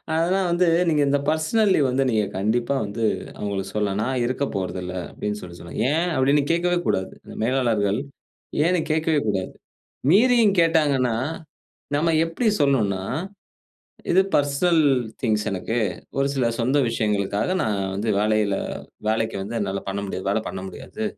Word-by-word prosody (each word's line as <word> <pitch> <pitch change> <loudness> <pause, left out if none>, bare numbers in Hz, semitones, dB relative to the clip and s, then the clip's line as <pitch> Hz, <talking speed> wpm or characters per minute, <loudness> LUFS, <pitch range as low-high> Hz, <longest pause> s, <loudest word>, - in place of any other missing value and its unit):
ஆனா 170 +4 +2
வந்து, 175 +1 +3 0.2
நீங்க 150 -2 +2
இந்த 145 +1 +3
பெர்சனல் 160 +8 +2
லீவ் 140 -3 +3
வந்து, 130 +2 +1
நீங்க 110 -3 +2
கண்டிப்பா 120 +7 0
வந்து 105 +3 -4 0.3
அவுங்களுக்கு 100 -1 -4
சொல்லலாம். 105 -1 0
"நான் 130 +1 -1
இருக்க 130 +3 -1
போறதில்ல" 90 -1 -3 0.2
அப்டின்னு 105 0 -4
சொல்லி 85 -1 -10
சொல்லலாம். 85 - -8
"ஏன்?" 170 +3 +1
அப்டின்னு 140 +2 +3
கேக்கவே 175 +1 +2
கூடாது, 95 - -1 0.3
மேலாளர்கள். 115 -4 +1 0.7
ஏன்னு 180 0 +2
கேட்கவே 160 -1 +2
கூடாது. 95 -3 -1 0.6
மீறியும் 225 -1 +5
கேட்டாங்கன்னா, 145 -7 +2 0.8
நம்ம 165 +3 +2
எப்டி 165 +8 -1
சொல்னுன்னா 110 -9 +2 1.1
"இது 185 - +5
பெர்சனல் 150 +4 +3 0.4
திங்க்ஸ் 110 -3 +1
எனக்கு. 100 +5 -2 0.4
ஒரு 135 - +2
சில 130 -3 +1
சொந்த 130 +5 +2
விஷயங்களுக்காக 105 - 0
நான் 105 -2 0 0.2
வந்து 105 +4 -2
வேலையில 105 -1 +2 0.5
வேலைக்கு 110 -1 0
வந்து 115 +4 -4
என்னால 100 -1 -2
பண்ண 100 +1 -2
முடியாது 95 0 -4
வேல 110 - +1
பண்ண 95 - -5
முடியாது. 220 - -7
120 Hz, 140 wpm, -23 LUFS, 100-155 Hz, 1.1 s, மீறியும்